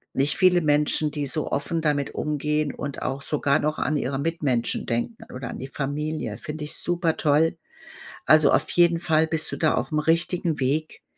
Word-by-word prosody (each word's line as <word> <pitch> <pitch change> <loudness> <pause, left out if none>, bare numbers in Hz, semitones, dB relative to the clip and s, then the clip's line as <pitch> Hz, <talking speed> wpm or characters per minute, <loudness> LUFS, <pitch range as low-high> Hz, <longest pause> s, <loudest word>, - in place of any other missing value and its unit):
nicht 140 +2 +2
viele 180 -2 +5
Menschen, 150 0 +2
die 145 -1 -3
so 155 +2 -3
offen 160 +4 -1
damit 145 -2 0
umgehen 150 0 -1
und 140 -1 -6
auch 135 +1 -3
sogar 145 -1 +1
noch 150 +1 -1
an 150 0 0
ihre 135 0 -2
Mitmenschen 145 -6 -1
denken 120 - -3
oder 125 -2 -6
an - - -6
die 135 - -6
Familie. 150 +3 -3
Finde 150 0 -6
ich 150 - -4
supertoll. 165 -2 +1 0.7
Also, 155 -1 +6
auf - - +2
jeden 170 -1 +4
Fall 160 -1 +2
bist 160 -1 -1
du - - -2
da 155 - +2
aufm 155 - -1
richtigen 165 0 0
Weg. 150 +5 -1
150 Hz, 175 wpm, -24 LUFS, 145-160 Hz, 0.7 s, Also